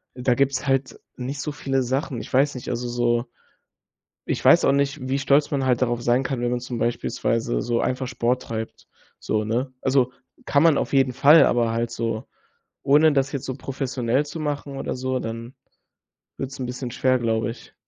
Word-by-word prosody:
Da 125 -1 +1
gibt's 140 0 0
halt 135 -1 0 0.2
nicht 130 +3 -5
so 150 - -3
viele 135 -2 -1
Sachen. 130 0 -2
Ich - - -10
weiß 140 +2 +3
nicht, 125 - -6
also 125 0 -2
so 120 0 +1 1.0
Ich - - -3
weiß - - +7
auch - - +5
nicht, 140 +2 0
wie 135 - +1
stolz 140 +2 +3
man 135 -2 0
halt 125 -2 +2
darauf 120 -1 0
sein 120 +2 +2
kann, 130 -2 -3
wenn 120 0 0
man 125 - 0
zum 125 0 -5
beispielsweise 115 0 -1
so 120 -1 0
einfach 130 0 -1
Sport 125 +1 -1
treibt, 110 -1 -6 0.3
so, 110 0 -1
ne? 125 +4 -2
Also 130 -2 +2 0.3
kann 140 - +3
man 165 -3 +5
auf - - -2
jeden 135 -2 +3
Fall, 150 +6 +7
aber 120 -1 +1
halt 115 +1 -1
so 115 -1 -3 0.6
ohne 150 +2 +5
das 135 0 +1
jetzt 140 -3 -4
so 130 - -3
professionell 130 -1 -1
zu 160 +3 -7
machen 145 -2 -4
oder - - -3
so 130 0 -2
dann 115 +1 -6 0.9
wird's 135 0 -5
'n 125 - -2
bisschen 125 0 -5
schwer, 130 0 +2
glaube 110 -1 0
ich. 120 - -16
130 Hz, 195 wpm, -23 LUFS, 120-135 Hz, 1.0 s, weiß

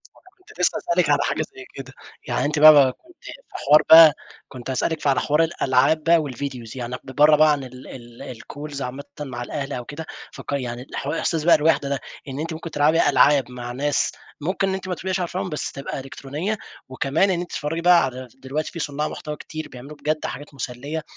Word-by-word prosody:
ما - - -20
أنا 370 - -21
كُنت 365 - -18
لسه 180 - +2
هاسألِك 170 -3 0
على 145 - +4
حاجة 140 +2 -1
زي 130 -1 -10
كده، 135 -1 -9 0.3
يعني - - 0
أنتِ 150 0 0
بقى 150 -4 +8
كُنتِ 335 - -22
في - - -8 0.3
حوار 150 +1 +5
بقى، 160 -2 +10 0.3
كُنت 125 -1 -9
هاسألِك 155 +5 -1
ف - - -1
على 140 0 +3
حوار 150 +2 +2
الألعاب 155 -1 +2
بقى 165 -1 +4
والVideos 130 -4 -6
يعني 125 0 -4
ب - - -8
ب - - -15
برّا 150 +1 +6
بقى 155 0 +5
عن 145 -2 -1
ال 130 0 -11
ال 120 0 -10
الCalls 145 +4 -8
عامةً 130 +3 -5 0.2
مع 130 -4 -5
الأهل 135 +3 -5
أو 125 -1 -5
كده، 150 +5 -7 0.3
فك - - -9
يعني 125 -3 -3
حو 140 +2 -3
إحساس 165 -1 -1
بقى 170 - +6
الوَحدة 150 -2 +2
ده 140 -1 -1 0.3
إن 135 +1 -6
أنتِ 165 +2 -3
ممكن 160 +1 -7
تلعَبي 150 +1 +3
ألعاب 140 -3 +4
مع 120 -1 -6
ناس 140 +3 0 0.3
ممكن 190 +5 0
إن 190 - -1
أنتِ 190 0 -5
ما 180 - -2
تبقيش 190 +2 -3
عارفاهُم 180 +1 -3
بس 150 - -4
تبقى 135 0 -6
إلكترونية 140 +9 -4 0.3
وكمان 140 +8 +1
إن 180 - 0
أنتِ 175 - -5
تتفرجي 155 +3 -3
بقى 175 -1 +6
على 130 0 -6
دلوقتي 135 +4 -4
في 170 - -7
صُنّاع 150 0 -2
محتوى 150 -2 -6
كتير 155 +1 -8
بيعمَلوا 135 +4 -11
بجد 155 +1 -2
حاجات 145 0 -7
مُسَلّية، 140 +4 -5
145 Hz, 215 wpm, -22 LUFS, 130-160 Hz, 0.3 s, بقى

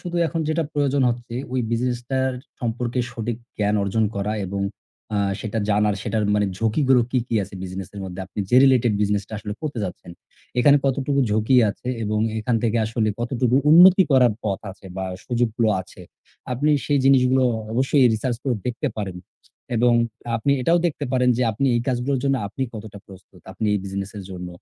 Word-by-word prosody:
শুধু 175 -1 -5
এখন 165 0 -3
যেটা 160 +1 0
প্রয়োজন 140 -1 +1
হচ্ছে 120 0 -4 0.2
ওই 130 - +1
business 120 +1 0
টার 130 0 +1 0.3
সম্পর্কে 120 +1 -2
সঠিক 115 -1 -4 0.2
জ্ঞান 105 0 +1
অর্জন 110 +3 +1
করা 100 +2 -1
এবং 100 +1 -4 0.5
আ - - +1 0.2
সেটা 110 0 -3
জানার, 105 0 +2
সেটার 110 -2 -1
মানে 105 -1 +2
ঝুঁকি 115 +6 +1
গুলো 130 -2 +5
কি, 130 - +1
কি, 115 - -3
আছে 95 - -9
business 95 0 -6
এর 100 - -6
মধ্যে। 95 0 -7
আপনি 95 - -12
যে 125 - +5
related 125 -4 +4
business 105 -1 +1
টা - - -15
আসলে 105 0 -5
করতে 145 -6 -4
চাচ্ছেন 90 -2 -6 0.5
এখানে 145 +2 +6
কতটুকু 140 +1 +1
ঝুঁকি 110 +5 +2
আছে 125 - -9 0.2
এবং 105 0 -1 0.2
এখান 115 +2 0
থেকে 115 0 +1
আসলে 110 -1 0
কতটুকু 125 +1 +1
উন্নতি 180 +3 +8
করার 125 -4 +5
পথ 100 -3 -1
আছে 95 0 -14
বা 95 - -2 0.2
সুযোগগুলো 120 -2 0
আছে। 95 - -12 0.5
আপনি 145 +5 +1 0.2
সেই 145 -1 +2
জিনিসগুলো 130 -1 +4 0.3
অবশ্যই 135 +2 +3
research 115 +2 -2
করে 130 -3 0
দেখতে 125 +4 -2
পারেন 95 -4 -4 0.6
এবং 120 +1 +4 0.4
আপনি 140 +5 +1
এটাও 170 +6 +3
দেখতে 155 - -3
পারেন 125 -1 +2
যে 125 - +1
আপনি 135 +7 -1
এই 120 - +2
কাজগুলোর 130 +2 0
জন্য 135 -1 +2
আপনি 135 - -5
কতটা 105 -1 -8
প্রস্তুত, 95 -2 -16
আপনি 110 - -3
এই - - +1
business 100 +1 -5
এর 100 - -6
জন্য। 90 -1 -6
120 Hz, 190 wpm, -22 LUFS, 105-130 Hz, 0.6 s, উন্নতি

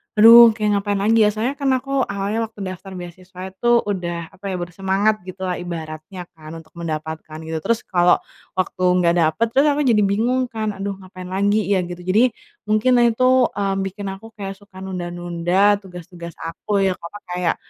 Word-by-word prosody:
aduh 225 +2 +10 0.2
kayak 215 -1 0
ngapain 205 0 -2
lagi 225 +2 +3
ya, - - +5
soalnya 235 +6 -2
kan 280 - 0
aku 270 +2 -5 0.2
awalnya 200 +2 -2
waktu 220 -1 -18
daftar 185 +1 -8
beasiswa 180 +1 -11
itu 190 +5 -4 0.2
udah, 175 -3 -3 0.2
apa 190 - -28
ya, - - -2
bersemangat 195 +4 0
gitu 185 +1 -9
lah 180 - -1
ibaratnya 160 +1 -7 0.2
kan 155 0 -10
untuk 160 -1 -18
mendapatkan, 160 -1 -5
gitu. 160 0 -3
Terus 230 -1 +1
kalau 175 -1 +5 0.4
waktu 185 0 -2 0.2
nggak 170 0 +4
dapet 160 +7 +2
terus 275 +4 +4
aku 290 +1 0
jadi 215 - +3
bingung 250 +5 +1
kan, 220 -1 -3
aduh 195 0 -4
ngapain 185 -1 -10
lagi 205 +2 +1
ya, 195 - +3
gitu. 175 0 -7
Jadi 210 +8 +3 0.4
mungkin 215 +4 +2
nah 240 -1 +5
itu, 230 +3 -1 0.4
eee, 195 -1 0
bikin 195 +1 -5
aku 195 +3 -10
kayak 195 -2 -6
suka 200 -2 -15
nunda-nunda, 175 +2 0
tugas-tugas 175 -3 -10
aku 185 +5 -2
yang, 190 -1 +1
apa, 170 +5 -9
kayak 180 -1 0
190 Hz, 185 wpm, -21 LUFS, 175-210 Hz, 0.4 s, aduh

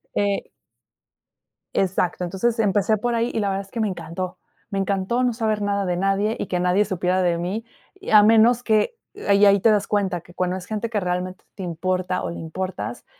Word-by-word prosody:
Eh 200 -1 0 1.2
exacto. 180 -1 0
Entonces 195 +7 0
empecé 205 0 +2
por 240 +2 -1
ahí, 230 +1 0
y - - 0
la 200 - 0
verdad 195 0 -2
es 195 - -21
que 230 - -5
me 215 - +2
encantó, 175 0 -5 0.3
me 195 - -2
encantó 195 +5 0
no 245 - +2
saber 220 -2 -1
nada 200 -1 0
de 180 -1 -1
nadie 195 +3 +1
y - - -3
que 180 - -1
nadie 180 +3 +3
supiera 185 -1 0
de 175 -2 +2
mí, 195 +7 -3 0.3
y, 390 - -8
a 210 -1 +8
menos 225 +3 +5
que 220 - +2 0.3
ahí 200 0 +5
ahí 200 0 +6
te 225 - +4
das 205 -2 +1
cuenta 195 -4 0
que 175 - -17
cuando 180 0 -1
es 185 -1 -7
gente 220 +1 -3
que 220 -2 0
realmente 180 0 -3
te 195 - -6
importa, 185 +1 -2
o, - - -2
le 170 - -6
importas, 185 +3 -5
195 Hz, 210 wpm, -23 LUFS, 180-215 Hz, 1.2 s, a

